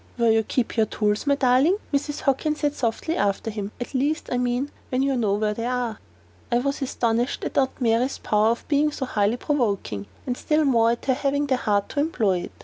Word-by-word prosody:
"Where 235 -1 +4
you 220 0 +4
keep 235 +2 -2
your 220 -1 +3
tools, 210 +4 -1
my 280 - +4
darling," 275 +7 +3 0.2
Mrs. 290 +1 -1
Hockin 290 +2 +1
said, 295 -1 -1
softly, 255 +6 -1
after 205 +2 0
him: 205 -1 -5
"at 245 - -6
least, 290 +4 0
I 250 - +1
mean, 250 +3 -1 0.2
when 255 +1 +1
you 275 -1 +1
know 215 -5 +1
where 210 0 0
they 230 +2 -3
are." 245 -3 -2 0.5
I 240 - +4
was 275 +4 -1
astonished 240 -2 0
at - - -4
Aunt 265 -1 +1
Mary's 245 +2 +1
power 210 0 +2
of 235 - -2
being 300 +1 +2
so 275 - -3
highly 210 -1 +1
provoking, 205 - -1 0.2
and 250 - -1
still 305 +3 +1
more 230 -4 +4
at 235 0 -2
her 265 - +3
having 285 +2 0
the 270 -2 +2
heart 205 -4 0
to - - -3
employ 225 - +1
it. - - -7
245 Hz, 220 wpm, -24 LUFS, 220-280 Hz, 0.5 s, Where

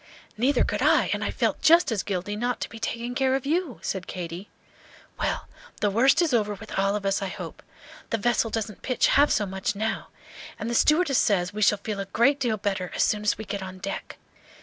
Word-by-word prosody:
"Neither 255 +6 +2
could - - -2
I, - - +4
and - - -2
I - - -1
felt - - -1
just 335 -3 +5
as 210 -4 0
guilty 200 +1 -3
not 245 +3 -1
to - - -3
be 225 - -10
taking 235 +2 -3
care 265 0 +2
of 270 - -3
you," 320 -3 -1
said 190 -2 -3
Katy. 180 +2 -6 0.7
"Well, - - -2 0.3
the 205 - +1
worst 265 - +4
is 315 -6 0
over 210 -3 +1
with 220 -1 -6
all 195 +1 +2
of 205 -1 -4
us, 195 +1 +1
I 195 - -2
hope. - - -8 0.5
The 225 - 0
vessel 235 +1 +1
doesn't 215 -2 -4
pitch 255 - +1
half 290 +1 +5
so 210 - +1
much 190 +1 -3
now, 220 +2 -2 0.5
and 230 - -4
the - - -1
stewardess 300 +1 +4
says 190 -2 +1
we 215 - -4
shall 210 0 +4
feel 205 0 -5
a 195 - -2
great 240 +9 +2
deal 235 -5 0
better 195 -3 -2
as - - +3
soon 210 - +1
as 210 - +1
we 220 - -7
get 200 0 -4
on 185 0 -7
deck. 195 +1 -6
215 Hz, 225 wpm, -26 LUFS, 195-245 Hz, 0.7 s, just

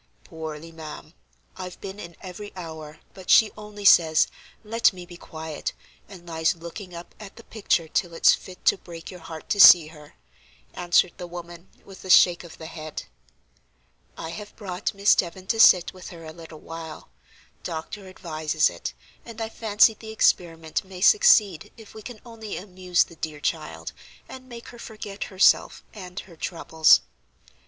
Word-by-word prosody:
"Poorly, 160 -1 -8
ma'am. 160 -2 -10 0.4
I've 180 -1 -8
been 195 +1 -8
in 170 -3 -9
every 200 +2 -9
hour, 160 -3 -9
but 190 -1 -12
she 220 - +6
only 210 -1 -10
says: 160 -4 +6 0.4
'Let 230 +2 +2
me 180 -1 -10
be 175 0 -12
quiet,' 160 -2 -6 0.4
and 185 -4 -13
lies 160 +1 0
looking 170 +2 -9
up 170 +1 -10
at 210 -2 -11
the 230 - -13
picture 200 -7 -1
till 170 +2 -2
it's - - +6
fit 180 -1 -9
to - - +4
break 165 0 -10
your 180 - -10
heart 160 -1 -10
to 205 - 0
see 170 -5 +9
her," 150 -2 -15 0.6
answered 175 0 +2
the 180 - -7
woman, 175 0 -10 0.2
with 195 -1 -13
a 190 - -9
shake 175 -1 +6
of 170 - -12
the 160 - -10
head. 155 -1 -7 1.1
"I 160 - -6
have 205 +4 -9
brought 195 -1 -4
Miss 200 +1 +5
Devon 185 +1 -2
to 225 +3 -1
sit 180 -5 +6
with 185 -1 -11
her 165 -2 -11
a 155 - -9
little 160 -2 -12
while. 165 -1 -9 0.5
Doctor 170 +5 -6
advises 160 -4 -1
it, - - -7 0.3
and 230 -1 -11
I 225 -1 -3
fancy 220 0 +3
the 220 +1 -12
experiment 165 -7 0
may 190 -1 -11
succeed 215 - +5
if 220 -2 -14
we 220 - -10
can 230 0 -10
only 225 -3 -7
amuse 180 -2 0
the 170 - -16
dear 155 -2 -5
child, - - -4 0.4
and 255 0 -12
make 235 -1 -10
her 240 - -13
forget 210 -3 -7
herself 190 -1 +3
and 185 -2 -8
her 175 - -16
troubles." 160 -1 +3
180 Hz, 170 wpm, -25 LUFS, 165-205 Hz, 1.1 s, see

